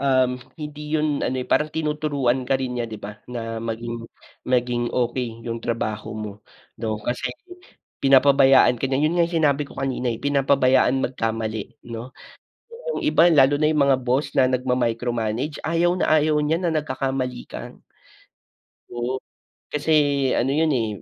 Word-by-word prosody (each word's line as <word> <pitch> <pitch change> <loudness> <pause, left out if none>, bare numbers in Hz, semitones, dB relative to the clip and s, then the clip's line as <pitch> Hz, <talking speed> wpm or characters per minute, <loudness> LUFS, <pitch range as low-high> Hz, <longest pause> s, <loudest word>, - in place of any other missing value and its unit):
um, 130 -2 +2 0.2
hindi 150 0 -7
yun 150 -2 0
ano 130 - -1
eh, - - -4
parang 150 0 +2
tinuturuan 145 -5 0
ka 135 - +3
rin 125 -1 -2
niya, 120 - -1
di 110 - -7
ba? 105 0 -8 0.2
Na 115 -1 -4
maging 115 +1 -4 0.5
maging 120 -1 +1
okey 120 -2 -2
yung 115 -1 -3
trabaho 110 -2 -3
mo 105 -1 -5 0.5
'no 110 -2 -1
kasi 125 +3 -2 0.7
pinapabayaan 135 -1 +6
ka - - -1
niya. 135 +1 0
Yun 155 - +2
nga 170 - +4
yung 170 - -3
sinabi 145 -1 +2
ko - - -14
kanina 130 -2 -1
eh, 110 - -7
pinapabayaan 135 -2 +3
magkamali 115 -2 -3
'no. 120 +3 -7 0.9
Yung - - -3
iba, 175 - +5
lalo 145 -2 +5
na 155 - +4
yung 150 -2 +2
mga 130 - +4
boss 130 +4 0
na 130 - +6
nagmamicromanage, 125 +1 -1
ayaw 170 +2 +2
na - - +1
ayaw 155 0 +2
niya 155 +3 +1
na 170 -2 0
nagkakamali 130 -3 -2
ka. - - -8 1.2
Oo. 120 +2 -3 0.5
Kasi 150 +2 -1 0.5
ano 135 - +1
yun 160 +1 +2
eh, 120 -6 +1
130 Hz, 155 wpm, -23 LUFS, 120-145 Hz, 1.2 s, pinapabayaan